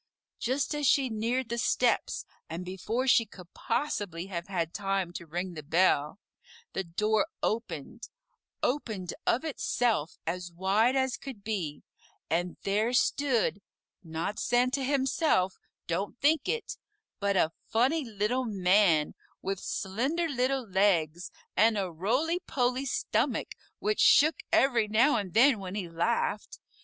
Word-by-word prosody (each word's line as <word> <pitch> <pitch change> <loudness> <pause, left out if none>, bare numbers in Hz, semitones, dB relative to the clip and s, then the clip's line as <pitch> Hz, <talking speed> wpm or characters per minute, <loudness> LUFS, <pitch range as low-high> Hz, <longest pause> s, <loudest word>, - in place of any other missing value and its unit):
Just 260 +5 0
as 295 -2 0
she 270 -1 +3
neared 235 +3 -1
the 235 0 -2
steps - - +1 0.2
and 170 +3 -5
before 210 +7 -2
she 245 - +6
could 185 -5 -14
possibly 190 - -2
have 175 -2 -5
had 170 -4 -2
time 195 -3 -1
to 170 - -7
ring 175 +3 -4
the 155 - -6
bell, 160 +1 +2 0.5
the 190 - -1
door 210 +5 +1 0.2
opened 220 -1 -3 0.5
opened 220 -9 -2
of 255 +7 +2
itself 240 - 0
as 175 +1 -3
wide 200 +8 +2
as 260 -1 +1
could 255 -8 -9
be 185 -9 -3 0.5
and 175 +2 0
there 215 +5 +1
stood 245 -6 +1 0.4
not 165 +5 -4
Santa 250 +3 +1
himself 265 - +1 0.3
don't 195 +7 -3
think 300 +1 +2
it 465 - -2 0.4
but 200 -1 +1
a 160 - +3 0.2
funny 265 +8 +2
Little 230 +2 -1
Man 185 -6 +3 0.3
with 195 -1 -2
slender 260 - -1
little 260 -3 0
legs 180 -4 +1 0.3
and 220 +2 +4
a 190 -3 -1
roly 255 - 0
poly 255 -3 -1
stomach - - -1 0.2
which 425 0 -1
shook 310 +2 +6
every 240 -5 +3
now 235 +6 +4
and 195 -5 -4
then 250 0 +6
when 190 0 -6
he 195 -4 -3
laughed. 205 +5 -1
210 Hz, 135 wpm, -29 LUFS, 180-255 Hz, 0.5 s, she